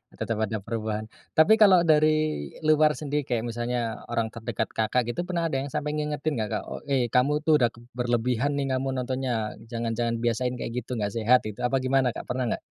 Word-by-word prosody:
tetep 115 -1 -3
ada 110 -2 -2
perubahan. 110 -1 -4 0.2
Tapi 215 +8 +6
kalau 190 -5 +7
dari 155 - +2
luar 155 -1 +4
sendiri 145 -1 -2
kayak 120 -3 -1
misalnya 120 -1 -2
orang 115 -1 -1
terdekat 115 -1 -4
Kakak 115 +2 0
gitu, 175 +6 -4
pernah 175 -2 -1
ada 135 - 0
yang 135 - -3
sampai 150 +1 -2
ngingetin 150 -2 -2
gak 110 -2 -2
Kak, - - -3
o - - -5
"Eh, 130 -4 +1
kamu 145 +4 +2
tuh 155 -1 +4
udah 120 - +4
k 120 0 -13
berlebihan 125 +3 0
nih 140 - 0
kamu 135 - -3 0.2
nontonnya. 125 -4 -2 0.2
Jangan 115 -1 -3
jangan 115 0 -1
biasain 125 +2 0
kayak 115 - -5
gitu, 125 +1 -6
gak 105 -3 -2
sehat 115 +3 +3
itu," 105 -1 -7
apa 130 +1 0
gimana 130 -2 +2
Kak, - - -5
pernah 125 -1 -1
gak? - - -12
125 Hz, 205 wpm, -26 LUFS, 115-150 Hz, 0.2 s, kalau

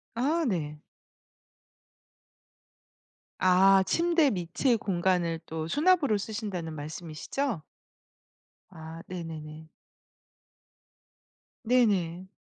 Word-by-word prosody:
아 305 +8 +1
네. 155 -8 -2 2.6
아 190 +1 +5
침대 335 - +3
밑의 190 +7 0
공간을 180 -4 0
또 160 0 -4
수납으로 295 - +3
쓰신다는 195 -6 -4
말씀이시죠? 160 - -4 1.1
아 160 -2 -10
네네네. 160 -3 -7 2.0
네네. 195 -7 +1
185 Hz, 145 characters per minute, -28 LUFS, 165-235 Hz, 2.6 s, 아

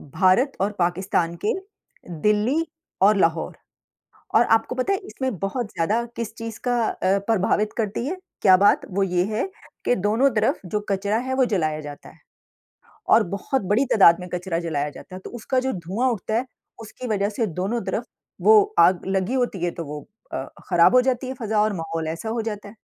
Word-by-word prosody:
भारत 190 - +3
और 200 +2 +1
पाकिस्तान 175 -1 0
के - - +2 0.7
दिल्ली 215 +10 +2 0.4
और 205 +2 +5
लाहौर। 165 -3 +1 0.8
और 230 - +7
आपको 225 +2 +2
पता 260 +10 0
है 390 - -1
इसमें 260 - -3
बहुत 215 +4 -2
ज़्यादा 210 +8 0
किस 230 -2 -4
चीज़ 230 -1 -6
का 245 0 +2
अ, 190 +2 +1
प्रभावित 215 0 +1
करती 220 +1 -2
है, 365 +5 -3 0.2
क्या 185 -2 +7
बात? 200 +2 +4
वो 195 +1 0
ये 180 -1 +1
है - - 0 0.4
कि 245 - +3
दोनों 220 +8 +2
तरफ़ 215 0 +1
जो 210 +4 -1
कचरा 200 +2 0
है - - 0
वो 260 -1 +3
जलाया 155 -9 0
जाता 145 -1 -10
है। - - -20 0.9
और - - +7
बहुत 265 +6 -1
बड़ी 240 +7 +3
तादाद 175 -4 +6
में 180 - -7
कचरा 180 -1 -2
जलाया 150 -4 -2
जाता 185 - -12
है। - - -8
तो - - -7
उसका 260 +4 -1
जो 260 +1 -1
धुआँ 190 +8 -1
उठता 220 -1 -3
है, 240 +4 0 0.3
उसकी 225 +3 -8
वज़ह 200 -2 +1
से 220 +2 -1
दोनों 220 +6 -1
तरफ़ 220 +5 -2 0.4
वो 435 -1 +8 0.2
आग 180 -1 +4
लगी 190 +4 0
होती 240 -9 -1
है 175 - +1
तो 170 - -6
वो 150 0 -8 0.2
अ, 130 - -3 0.2
ख़राब 175 +5 +5
हो 255 - +8
जाती 255 0 0
है 260 - -4
फ़ज़ा 220 -4 -1
और 215 0 +1
माहौल 165 -1 -4
ऐसा 165 +7 -4
हो 230 0 -1
जाता 210 -2 -5
है। 200 - -13
205 Hz, 195 wpm, -23 LUFS, 180-235 Hz, 0.9 s, वो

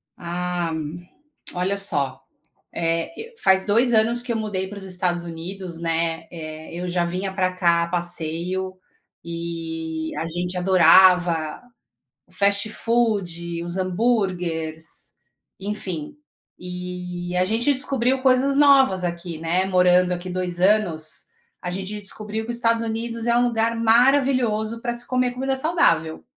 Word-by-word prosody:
Ah, 175 0 -3 0.8
olha 180 +2 0
só, 140 -9 0 0.5
eh, 165 - -2
e - - -25
faz 190 0 +4
2 235 +4 +3
anos 230 +2 +4
que 245 0 -4
eu 230 - 0
mudei 205 -4 -3
para 205 +1 -9
os 200 - -7
Estados 180 -2 -1
Unidos, 170 +1 -7
né, 165 0 -1
eh, 155 -1 -8
eu 175 +1 -4
já 175 0 +1
vinha 185 +3 -3
pra 185 -1 0
cá 170 -2 +3
a - - -3
passeio 175 +2 -2 0.5
e 165 -1 -5
a - - -2
gente 180 +2 -3
adorava 180 -3 +5 0.7
o - - -27
fast 200 +2 +2
food, 190 -8 -1
os 175 +2 -4
hamburgers, 180 -6 -1 0.8
enfim, 190 - -4 0.4
e 180 0 -6
a 180 - +3
gente 230 +7 +1
descobriu 265 -1 +1
coisas 265 +1 +3
novas 270 -10 +5
aqui, 170 -1 -4
né, 170 +3 0
morando 180 -1 +4
aqui 180 +1 -5
2 180 -1 -2
anos, 175 -6 +2 0.4
a 180 - -4
gente 195 +3 -5
descobriu 210 +2 -4
que 240 - -4
os - - -2
Estados 230 -1 +1
Unidos 230 +1 -4
é 235 - +3
um 245 0 +3
lugar 230 -1 0
maravilhoso 230 -1 +3
pra 240 0 -2
se 240 0 -2
comer 255 -1 +1
comida 265 +2 -2
saudável. 215 - +1
185 Hz, 140 wpm, -23 LUFS, 170-225 Hz, 0.8 s, adorava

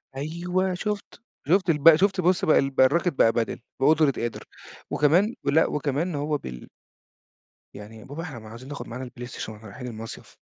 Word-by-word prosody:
أيوه 175 +6 -1
شُفت، 205 +4 -4 0.3
شُفت 185 +3 +3
الب 160 0 +7
شُفت 190 +2 +2
بُص 180 +1 +2
بقى 155 - +5
ال 135 - +1
بقى 130 -1 +4
الراكِت 170 +5 +2
بقى 115 - +4
padel 115 -1 -1 0.2
بقدرة 150 +1 +4
قادر. 120 -3 -4 0.5
وكمان 180 +10 +3
لأ، 150 +3 +3
وكمان 150 +4 -1
هو 150 +1 -1
بل 60 - -9 1.1
يعني 105 +2 -11
"يا - - -12
بابا 145 +5 -7
إحنا 145 -8 -7
ما 110 -1 -12
عايزين 115 +4 -11
ناخد 145 - -7
معانا 125 +3 -6
البلايستيشن 120 -3 -7
وإحنا 110 +1 -13
رايحين 115 +5 -8
المصيف." 115 -1 -9
145 Hz, 175 wpm, -25 LUFS, 120-170 Hz, 1.1 s, الب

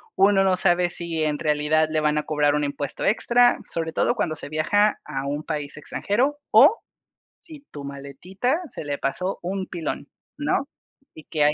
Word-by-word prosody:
Uno 195 0 +4
no 190 -1 +2
sabe, 175 -1 +2
si 170 -2 -2
en 150 -1 0
realidad 150 0 +2
le 155 - +1
van 150 0 +1
a - - -3
cobrar 150 -1 +1
un 150 - 0
impuesto 145 -1 -4
extra, 240 +3 +4
sobre 165 -1 -3
todo - - +2
cuando 155 - -1
se 145 - -8
viaja 205 +8 +2
a 135 0 -4
un 145 +2 -3
país 150 -3 -4
extranjero. 245 - -1
O, 285 - +7 0.6
si 310 -5 -11
tu 145 - -8
maletita 140 - -3
se - - -8
le 145 -1 -2
pasó 180 +9 -2
un 190 +2 -3
pilón, 170 -4 -5 0.3
¿no? - - 0 0.5
Y 155 - -12
que 150 -2 0
hay 150 - +4
160 Hz, 180 wpm, -24 LUFS, 150-195 Hz, 0.6 s, O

